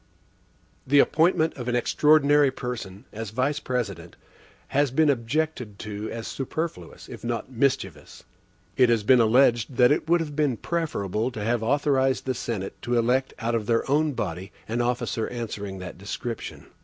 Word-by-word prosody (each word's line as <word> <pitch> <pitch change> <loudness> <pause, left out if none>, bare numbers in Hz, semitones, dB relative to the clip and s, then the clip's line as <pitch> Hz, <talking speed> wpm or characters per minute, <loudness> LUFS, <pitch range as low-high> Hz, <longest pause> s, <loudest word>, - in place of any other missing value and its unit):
The 145 +2 +4
appointment 160 +2 +3
of 125 -2 -6
an 120 - 0
extraordinary 145 +3 +4
person, 115 -7 -6
as 110 0 -5
Vice 130 +7 0
President, 100 - -4 0.5
has 145 0 +2
been 145 +3 +3
objected 125 -3 -2
to 105 +1 -6
as 115 -1 -6
superfluous, 135 - -5
if - - -10
not 120 +1 -3
mischievous. 135 +2 -2 0.5
It 125 -2 +4
has 115 -3 +2
been 125 +3 +5
alleged, 120 +1 +3
that 125 +1 +5
it 150 +2 0
would 175 +1 +5
have 150 -3 -4
been 145 -5 +1
preferable 115 - -2
to 110 -5 -6
have 115 +1 0
authorized 135 +1 +1
the 130 - 0
Senate 105 -5 -5
to 120 +1 0
elect 125 +3 +1
out 115 0 -2
of 110 -3 -1
their 115 -1 +1
own 150 +1 +2
body 95 -4 -4 0.2
an 115 +2 -1
officer 120 -2 -1
answering 105 -5 -5
that 90 -1 -8
description. 110 +3 -6
120 Hz, 160 wpm, -25 LUFS, 110-140 Hz, 0.5 s, been